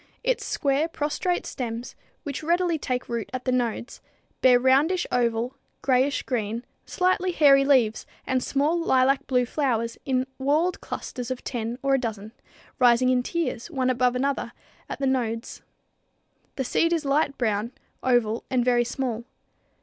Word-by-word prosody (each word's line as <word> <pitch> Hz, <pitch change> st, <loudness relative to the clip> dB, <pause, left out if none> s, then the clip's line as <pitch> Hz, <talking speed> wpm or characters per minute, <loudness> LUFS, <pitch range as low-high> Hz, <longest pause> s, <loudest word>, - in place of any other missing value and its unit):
Its -, -, 0 dB
square, 280 Hz, +3 st, 0 dB
prostrate 330 Hz, +3 st, -2 dB
stems, 235 Hz, -1 st, -5 dB, 0.3 s
which 285 Hz, -4 st, -4 dB
readily 340 Hz, 0 st, +1 dB
take 255 Hz, -2 st, -3 dB
root 235 Hz, -3 st, -3 dB
at 255 Hz, 0 st, -4 dB
the 255 Hz, -, +1 dB
nodes, 245 Hz, 0 st, -2 dB, 0.4 s
bear 250 Hz, -1 st, +6 dB
roundish 280 Hz, +8 st, +3 dB
oval, 240 Hz, +1 st, 0 dB, 0.3 s
grayish 265 Hz, +2 st, +2 dB
green, 230 Hz, -1 st, -3 dB, 0.2 s
slightly 370 Hz, 0 st, +1 dB
hairy 280 Hz, -5 st, +6 dB
leaves 255 Hz, -6 st, +2 dB, 0.2 s
and 260 Hz, -1 st, 0 dB
small 295 Hz, +7 st, +1 dB
lilac 270 Hz, -3 st, +2 dB
blue 250 Hz, -2 st, +2 dB
flowers 235 Hz, -4 st, -1 dB
in 260 Hz, -1 st, 0 dB
whorled 305 Hz, +7 st, +1 dB
clusters 245 Hz, -3 st, -6 dB
of 255 Hz, -1 st, -4 dB
ten 235 Hz, -1 st, -3 dB
or 275 Hz, 0 st, +2 dB
a 270 Hz, -, +3 dB
dozen, 220 Hz, -3 st, -5 dB, 0.5 s
rising 250 Hz, 0 st, +5 dB
in 255 Hz, -1 st, +3 dB
tiers, 255 Hz, -2 st, -3 dB
one 260 Hz, -5 st, 0 dB
above 250 Hz, 0 st, +1 dB
another, 275 Hz, +2 st, -1 dB, 0.4 s
at -, -, -4 dB
the 275 Hz, -, -2 dB
nodes. 235 Hz, -3 st, -2 dB, 0.9 s
The 265 Hz, -, -1 dB
seed 330 Hz, +6 st, +1 dB
is 320 Hz, -3 st, -1 dB
light 280 Hz, 0 st, +1 dB
brown, 220 Hz, -1 st, 0 dB, 0.3 s
oval 240 Hz, -3 st, +1 dB
and 255 Hz, -2 st, +1 dB
very 245 Hz, -1 st, +3 dB
small. 240 Hz, -2 st, -3 dB
255 Hz, 150 wpm, -25 LUFS, 240-285 Hz, 0.9 s, bear